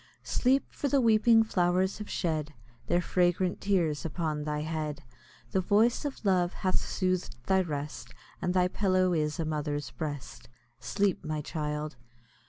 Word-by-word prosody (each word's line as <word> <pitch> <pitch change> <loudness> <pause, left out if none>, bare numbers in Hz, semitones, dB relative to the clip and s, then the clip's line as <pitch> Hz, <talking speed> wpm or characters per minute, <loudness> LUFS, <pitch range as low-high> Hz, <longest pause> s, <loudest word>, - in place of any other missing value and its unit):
Sleep! 265 +2 +2
for 285 - -2
the 280 0 +3
weeping 225 -1 +5
flowers 185 -1 +1
have 210 - -7
shed 155 -3 -2 0.3
Their 175 - +2
fragrant 180 +1 +1
tears 170 -7 +1
upon 155 -2 -2
thy 150 0 -2
head, 155 -2 -3 0.5
The 190 - +2
voice 220 - +3
of 275 -6 -5
love 180 -2 +2
hath 185 - +3
sooth'd 185 -5 -1
thy 190 0 +3
rest, 145 -8 -5 0.3
And 180 0 0
thy 180 -1 +4
pillow 185 -1 +2
is 150 -1 0
a 165 - 0
mother's 150 -1 -2
breast. 145 -6 -6 0.3
Sleep, 200 -2 0
my 155 0 -2
child! 150 -1 -4
175 Hz, 150 wpm, -29 LUFS, 150-190 Hz, 0.5 s, weeping